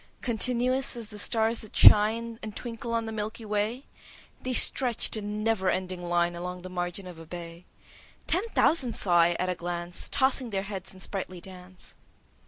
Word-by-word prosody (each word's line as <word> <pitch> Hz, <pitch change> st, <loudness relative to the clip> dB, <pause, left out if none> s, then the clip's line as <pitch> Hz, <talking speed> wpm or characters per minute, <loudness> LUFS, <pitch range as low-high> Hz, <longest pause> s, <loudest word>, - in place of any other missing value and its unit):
Continuous 250 Hz, +2 st, 0 dB
as 225 Hz, -2 st, -5 dB
the 210 Hz, -, -6 dB
stars 225 Hz, +1 st, +1 dB
that 215 Hz, -, -10 dB
shine 225 Hz, +2 st, +6 dB
And 215 Hz, -1 st, -6 dB
twinkle 235 Hz, -1 st, -5 dB
on 230 Hz, -1 st, 0 dB
the 220 Hz, -, -4 dB
Milky 220 Hz, +1 st, -4 dB
Way, 215 Hz, +5 st, -1 dB, 0.6 s
They 255 Hz, 0 st, -2 dB
stretch'd 245 Hz, -1 st, +2 dB
in 210 Hz, 0 st, -3 dB
never 215 Hz, -4 st, +2 dB
ending 185 Hz, -1 st, -2 dB
line 175 Hz, 0 st, +2 dB
Along 180 Hz, +1 st, -5 dB
the 185 Hz, -, -7 dB
margin 175 Hz, +1 st, -3 dB
of 180 Hz, -3 st, -9 dB
a 165 Hz, -, -10 dB
bay: 170 Hz, 0 st, -8 dB, 0.6 s
10 370 Hz, +5 st, +2 dB
Ten 460 Hz, -, -12 dB
thousand 260 Hz, -8 st, +3 dB
saw 175 Hz, -3 st, +3 dB
I 170 Hz, +1 st, +5 dB
at 185 Hz, -, -1 dB
a -, -, +2 dB
glance, 175 Hz, 0 st, -5 dB
Tossing 265 Hz, -2 st, +1 dB
their 195 Hz, -2 st, -1 dB
heads 195 Hz, -2 st, -6 dB
in 190 Hz, -, -13 dB
sprightly 185 Hz, -2 st, -5 dB
dance. 185 Hz, 0 st, -12 dB
210 Hz, 185 wpm, -28 LUFS, 180-230 Hz, 0.6 s, shine